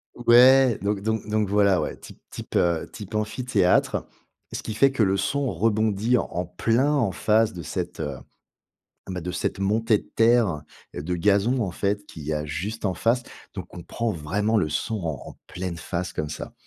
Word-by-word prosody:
Ouais, 125 Hz, +1 st, +6 dB
donc 100 Hz, 0 st, -1 dB
donc 110 Hz, +2 st, -2 dB
donc 105 Hz, -1 st, +1 dB
voilà, 100 Hz, -2 st, +3 dB
ouais, -, -, -3 dB
type -, -, -14 dB
type, -, -, -8 dB
heu, 85 Hz, -2 st, +1 dB
type 105 Hz, -1 st, -10 dB
amphithéâtre. 110 Hz, -3 st, +1 dB, 0.4 s
Ce -, -, -5 dB
qui 110 Hz, -, -4 dB
fait 135 Hz, +5 st, +4 dB
que 130 Hz, -4 st, +1 dB
le 95 Hz, -1 st, +2 dB
son 135 Hz, +7 st, -1 dB
rebondit 110 Hz, +4 st, +1 dB
en -, -, 0 dB
en 90 Hz, +1 st, -2 dB
plein 115 Hz, -, +1 dB
en 115 Hz, -9 st, +1 dB
face 110 Hz, +6 st, +2 dB
de 90 Hz, -, -7 dB
cette, 85 Hz, +3 st, -5 dB
heu, 75 Hz, -4 st, -3 dB, 0.9 s
bah, 90 Hz, -1 st, -4 dB
de 90 Hz, +2 st, -4 dB
cette 90 Hz, +2 st, -2 dB
montée 110 Hz, +2 st, +2 dB
de -, -, -15 dB
terre 115 Hz, -9 st, +3 dB, 0.3 s
de 80 Hz, +5 st, -3 dB
gazon, 100 Hz, +7 st, +2 dB
en 95 Hz, -, -2 dB
fait, 100 Hz, +3 st, -2 dB
qu'il 80 Hz, -, -10 dB
y 80 Hz, -, -2 dB
a 75 Hz, 0 st, -2 dB
juste 100 Hz, +10 st, -5 dB
en 95 Hz, -2 st, +1 dB
face 120 Hz, +2 st, +1 dB, 0.3 s
donc 95 Hz, -4 st, -6 dB
on 85 Hz, -, -7 dB
prend 115 Hz, +5 st, -2 dB
vraiment 105 Hz, +7 st, -1 dB
le 80 Hz, -7 st, +2 dB
son 110 Hz, +9 st, -2 dB
en 80 Hz, -3 st, -3 dB
en -, -, -14 dB
pleine 90 Hz, -1 st, -5 dB
face 85 Hz, +2 st, -4 dB
comme 75 Hz, -1 st, -4 dB
ça. -, -, -7 dB
100 Hz, 195 wpm, -24 LUFS, 90-115 Hz, 0.9 s, Ouais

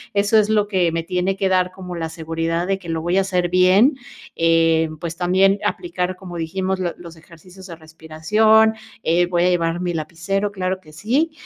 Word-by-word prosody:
eso 205 Hz, +2 st, +2 dB
es 210 Hz, 0 st, +1 dB
lo 210 Hz, -1 st, +2 dB
que 185 Hz, -4 st, +1 dB
me 165 Hz, 0 st, -2 dB
tiene 180 Hz, +2 st, -1 dB
que 195 Hz, -, 0 dB
dar 185 Hz, -1 st, +1 dB
como 185 Hz, -1 st, -8 dB
la 165 Hz, -1 st, -4 dB
seguridad 165 Hz, +1 st, -3 dB
de 185 Hz, +3 st, -1 dB
que 180 Hz, -, -13 dB
lo 165 Hz, -1 st, -2 dB
voy 175 Hz, +3 st, 0 dB
a -, -, +4 dB
hacer 180 Hz, -2 st, -1 dB
bien, 185 Hz, -, +4 dB, 0.4 s
eh, 165 Hz, -1 st, +3 dB
pues 165 Hz, -1 st, -5 dB
también, 190 Hz, +2 st, +2 dB
aplicar 185 Hz, -, -2 dB
como 180 Hz, -2 st, -9 dB
dijimos, 185 Hz, +3 st, -2 dB
los 175 Hz, -2 st, -2 dB
los 170 Hz, -1 st, -12 dB
ejercicios 180 Hz, +4 st, -15 dB
de 170 Hz, -, -8 dB
respiración, 165 Hz, +8 st, +2 dB, 0.3 s
eh, 170 Hz, +2 st, +2 dB
voy 175 Hz, -1 st, +1 dB
a 180 Hz, -, +3 dB
llevar 170 Hz, -1 st, 0 dB
mi 175 Hz, -1 st, -2 dB
lapicero, 170 Hz, +6 st, -3 dB
claro 185 Hz, -1 st, -2 dB
que 155 Hz, -4 st, -18 dB
sí, 250 Hz, -, 0 dB
180 Hz, 200 wpm, -20 LUFS, 165-195 Hz, 0.4 s, a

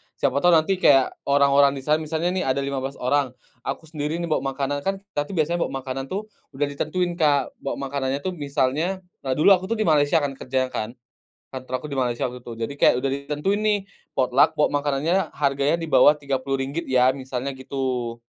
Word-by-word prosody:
Siapa 140 Hz, -, +1 dB
tau 175 Hz, -, +2 dB
nanti 180 Hz, +4 st, +2 dB
kayak 135 Hz, -5 st, +5 dB, 0.2 s
orang-orang 140 Hz, 0 st, +4 dB
di 135 Hz, -, -7 dB
sana, 155 Hz, +2 st, +2 dB
misalnya, 160 Hz, +3 st, -1 dB
nih, 185 Hz, 0 st, -1 dB
ada 135 Hz, +1 st, +1 dB
15 135 Hz, 0 st, -3 dB
orang, 130 Hz, 0 st, 0 dB, 0.2 s
aku 135 Hz, +6 st, -5 dB
sendiri, 150 Hz, 0 st, -2 dB
nih, 170 Hz, -, -2 dB
bawa -, -, +3 dB, 0.2 s
makanan, 145 Hz, +1 st, -1 dB
kan, 195 Hz, -, +1 dB, 0.2 s
kita, 145 Hz, -3 st, -2 dB
tuh, 195 Hz, -, -7 dB
biasanya, 170 Hz, +2 st, +1 dB
bawa -, -, -10 dB
makanan, 135 Hz, 0 st, -4 dB
tuh, 195 Hz, +8 st, -3 dB, 0.3 s
udah 145 Hz, +2 st, +1 dB
ditentuin 175 Hz, +5 st, -1 dB
Kak. 145 Hz, -4 st, +2 dB
Bawa 135 Hz, -, -3 dB
makanannya, 135 Hz, 0 st, -3 dB
tuh, 185 Hz, -, -1 dB
misalnya 150 Hz, +4 st, -1 dB, 0.2 s
nah, 130 Hz, -1 st, -2 dB
dulu 155 Hz, +6 st, +5 dB
aku 185 Hz, -1 st, +4 dB
tuh 230 Hz, -, -1 dB
di 215 Hz, -, 0 dB
Malaysia 155 Hz, -1 st, +3 dB
kan 145 Hz, -1 st, -1 dB
kerja 130 Hz, 0 st, -1 dB
kan, 110 Hz, -1 st, -4 dB, 0.6 s
kantor 130 Hz, 0 st, -7 dB
aku -, -, -5 dB
di 140 Hz, -, -3 dB
Malaysia 120 Hz, -2 st, 0 dB
waktu 125 Hz, -, -9 dB
itu. 120 Hz, -1 st, -9 dB
Jadi 130 Hz, -, -5 dB
kayak -, -, +6 dB
udah 135 Hz, -, 0 dB
ditentuin, 150 Hz, +8 st, -1 dB
nih, 215 Hz, -1 st, +2 dB, 0.4 s
potluck 135 Hz, +5 st, +3 dB
bawa 145 Hz, -1 st, +2 dB
makanannya 150 Hz, +6 st, 0 dB
harganya 140 Hz, +2 st, +1 dB
di 165 Hz, -, -5 dB
bawah 150 Hz, +1 st, +6 dB
RM30 135 Hz, +2 st, -3 dB
ya, 130 Hz, 0 st, +4 dB
misalnya 130 Hz, 0 st, -4 dB
gitu. 130 Hz, -3 st, -3 dB
140 Hz, 200 wpm, -23 LUFS, 135-155 Hz, 0.6 s, kayak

